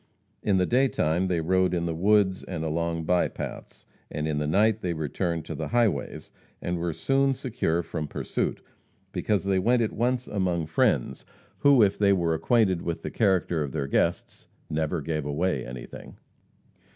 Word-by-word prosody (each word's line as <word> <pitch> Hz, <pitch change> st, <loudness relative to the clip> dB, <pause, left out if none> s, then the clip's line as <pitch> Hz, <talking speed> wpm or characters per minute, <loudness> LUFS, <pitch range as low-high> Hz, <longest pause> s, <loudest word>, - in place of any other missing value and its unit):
In 100 Hz, -2 st, +2 dB
the 90 Hz, -, +3 dB
day 130 Hz, +5 st, +3 dB
time 85 Hz, -4 st, 0 dB
they 90 Hz, -3 st, 0 dB
rode 90 Hz, +2 st, +2 dB
in 85 Hz, -1 st, -1 dB
the 85 Hz, -, -1 dB
woods 95 Hz, +2 st, +3 dB
and 85 Hz, -4 st, -5 dB
along 85 Hz, +1 st, -1 dB
by 90 Hz, +2 st, +2 dB
paths; -, -, -8 dB, 0.2 s
in 75 Hz, 0 st, -2 dB
the 75 Hz, -, -1 dB
night 105 Hz, +6 st, +3 dB
they 90 Hz, -2 st, -1 dB
returned 80 Hz, +1 st, -2 dB
to -, -, -5 dB
the -, -, -4 dB
highways, 120 Hz, -3 st, 0 dB, 0.3 s
and 85 Hz, 0 st, -3 dB
were 85 Hz, 0 st, -1 dB
soon 135 Hz, -, +1 dB
secure 105 Hz, -10 st, -1 dB
from 80 Hz, -3 st, -4 dB
pursuit -, -, -3 dB, 0.5 s
because 105 Hz, -2 st, 0 dB
they 95 Hz, -1 st, +1 dB
went 120 Hz, +5 st, +3 dB
at 110 Hz, -, -2 dB
once 125 Hz, +2 st, 0 dB
among 90 Hz, -5 st, -1 dB
friends 75 Hz, -4 st, +1 dB, 0.4 s
who, 140 Hz, -5 st, +6 dB
if 100 Hz, -1 st, +1 dB
they 100 Hz, -1 st, +4 dB
were 85 Hz, -3 st, +1 dB
acquainted 95 Hz, +1 st, +2 dB
with 85 Hz, -1 st, -4 dB
the -, -, -4 dB
character 95 Hz, -6 st, +1 dB
of 70 Hz, -3 st, -3 dB
their 70 Hz, -3 st, -1 dB
guests, 70 Hz, -, -1 dB, 0.2 s
"never 80 Hz, +1 st, -1 dB
gave 75 Hz, 0 st, -2 dB
away 75 Hz, -1 st, -1 dB
anything." -, -, -9 dB
90 Hz, 175 wpm, -26 LUFS, 80-105 Hz, 0.5 s, who